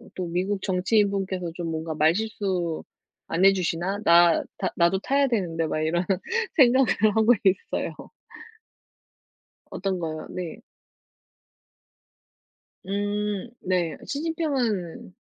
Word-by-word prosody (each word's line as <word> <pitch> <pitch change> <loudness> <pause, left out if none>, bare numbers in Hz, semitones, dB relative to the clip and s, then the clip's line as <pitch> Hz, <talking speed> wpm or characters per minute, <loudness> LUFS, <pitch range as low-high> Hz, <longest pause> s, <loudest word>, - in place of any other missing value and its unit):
또 185 - -3
'미국 190 +4 -1
정치인분께서 190 -2 0
좀 175 -1 -4
뭔가 160 0 -3
말실수 180 0 0 0.4
안 175 +4 +2
해주시나? 190 0 +1
나 170 -2 +5
나 - - -1
나도 170 +2 +3
타야 275 +6 +2
되는데.' 170 -9 -1
막 155 - -2
이런 170 +3 0 0.5
생각을 260 -3 +5 0.3
하고 220 +2 +5
있어요. 190 0 0 1.8
어떤 190 0 -2
거요? 155 -2 -5
네. 180 -3 -6 2.3
음. 205 +2 -2
네. 180 -3 -1
시진핑은 275 - -2
190 Hz, 200 characters per minute, -25 LUFS, 170-210 Hz, 2.3 s, 나